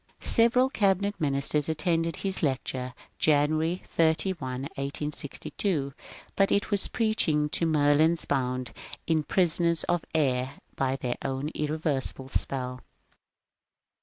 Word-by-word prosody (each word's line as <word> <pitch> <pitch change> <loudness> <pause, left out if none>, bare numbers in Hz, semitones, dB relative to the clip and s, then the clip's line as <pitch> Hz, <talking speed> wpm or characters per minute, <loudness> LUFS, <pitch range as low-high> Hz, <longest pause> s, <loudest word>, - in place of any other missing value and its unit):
Several 235 +3 +4
Cabinet 200 -2 +1
ministers 145 +1 +1
attended 165 +1 0
his 195 -1 -2
lecture 130 -3 -2 0.2
(Janu 150 -1 +3
ary 165 +3 -1
31, 160 -5 0
1862), 140 +2 -3 0.4
but 195 0 +2
it 200 +1 +1
was 200 -1 +4
preaching 200 -10 +1
to 165 - +1
Merlins 155 +2 +3
bound 130 -2 -2 0.3
in 160 -1 +2
prisons 170 +1 +2
of 175 -2 0
air 130 -4 +1 0.2
by 135 -1 0
their 125 -3 -3
own 135 +2 -3
irreversible 150 -3 -1
spell. 130 -2 -1
150 Hz, 110 wpm, -27 LUFS, 135-170 Hz, 0.4 s, Several